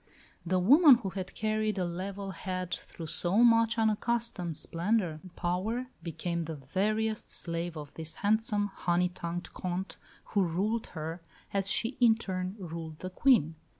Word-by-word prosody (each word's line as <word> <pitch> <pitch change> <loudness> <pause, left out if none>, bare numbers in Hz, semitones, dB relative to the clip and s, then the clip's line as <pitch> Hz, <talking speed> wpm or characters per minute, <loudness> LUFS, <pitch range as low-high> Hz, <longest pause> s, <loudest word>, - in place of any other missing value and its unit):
The 180 +2 +1
woman 275 - +8
who 225 -5 -4
had 190 -1 -6
carried 215 -1 0
a 185 - +1
level 195 +3 -4
head 185 0 -4
through 165 - -7
so 180 +7 +3
much 230 -1 +5
unaccustomed 220 -6 0
splendour 175 -2 0
and 185 -2 -14
power 215 +9 -1
became 170 0 -3
the 160 0 -5
veriest 210 +10 -1
slave 170 -1 -2
of 150 -2 -8
this 160 0 -4
handsome, 210 -1 +1
honey 180 0 +1
tongued 175 0 -5
Comte, 180 -1 -4 0.4
who 205 - +4
ruled 200 +7 -1
her, 160 +3 -4 0.3
as 195 -1 0
she 235 +6 +1
in 235 -3 +6
turn 185 -3 -4
ruled 165 -4 -6
the 185 +3 -6
Queen. 205 - +4
185 Hz, 150 wpm, -30 LUFS, 170-220 Hz, 0.4 s, woman